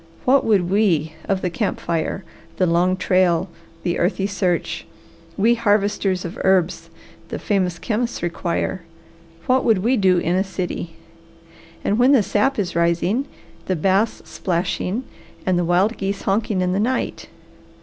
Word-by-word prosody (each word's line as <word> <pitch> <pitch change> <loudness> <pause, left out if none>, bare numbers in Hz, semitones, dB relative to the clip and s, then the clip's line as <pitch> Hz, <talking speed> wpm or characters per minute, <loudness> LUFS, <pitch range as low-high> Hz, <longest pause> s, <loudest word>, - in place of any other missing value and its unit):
What 270 +2 +4
would 200 -6 +2
we 170 -7 +2
of 195 -1 -1
the 180 - 0
camp - - -2
fire, 170 +3 -2 0.3
the 185 - +3
long 180 +2 +2
trail, 185 -1 +2 0.3
the 175 -1 -1
earthy 190 +2 +1
search, 180 -4 -1 0.5
we 225 +4 +4
harvesters 205 -4 +1
of 170 - -6
herbs 190 -2 +2 0.4
the - - -4
famous 185 -4 0
chemists 230 +1 -2
require, 175 +2 -2 0.6
what 255 +1 +3
would 210 -5 +2
we 250 +3 +3
do 190 -3 +4
in 175 +1 +1
a 190 - +2
city? 180 -3 -5 0.9
And 210 +3 +1
when 255 +3 +5
the 250 -7 +5
sap 215 +8 +1
is 190 -5 -2
rising, 170 +9 +1 0.4
the 185 - +1
bass 195 +6 +1
splashing, 185 +5 -2 0.4
and 185 -2 +2
the 175 - 0
wild 185 +6 +2
geese 195 0 -3
honking 200 -1 0
in 180 0 +1
the 195 - 0
night! 250 +5 -1
190 Hz, 150 wpm, -21 LUFS, 175-210 Hz, 0.9 s, when